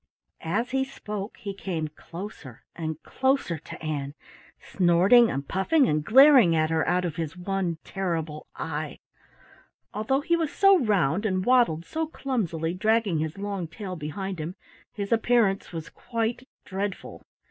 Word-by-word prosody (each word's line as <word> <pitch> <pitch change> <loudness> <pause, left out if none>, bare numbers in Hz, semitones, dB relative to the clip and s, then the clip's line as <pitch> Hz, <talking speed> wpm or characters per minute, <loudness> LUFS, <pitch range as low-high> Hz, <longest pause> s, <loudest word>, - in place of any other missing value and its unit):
As 230 +8 0
he 265 0 +1
spoke 210 -6 -6
he 205 -4 -6
came 175 -5 -3
closer 165 - -10
and 160 -2 -4
closer 265 - 0
to 155 - -11
Ann, 145 -2 -3 0.4
snorting 190 +7 +4
and 140 +1 -3
puffing 265 - +2
and 150 -4 +1
glaring 255 - +7
at 155 0 +1
her 160 -1 +1
out 180 0 +1
of 170 -1 -4
his 165 +1 -4
one 180 -2 -2
terrible 165 -5 -3
eye. 155 -1 -4 1.0
Although 220 +7 0
he 340 +3 +2
was 325 -3 -1
so 390 -2 +5
round 200 - +1
and 185 -3 0
waddled 235 -11 +3
so 320 0 -2
clumsily, 180 - -2
dragging 215 -2 +1
his 155 +2 -3
long 200 -3 -3
tail 185 +2 -7
behind 180 +4 -5
him, 160 +4 -5 0.4
his 200 -1 -5
appearance 225 -3 +2
was 165 -2 -6
quite 230 +2 -3 0.2
dreadful. 195 0 -5
190 Hz, 145 wpm, -26 LUFS, 160-230 Hz, 1.0 s, glaring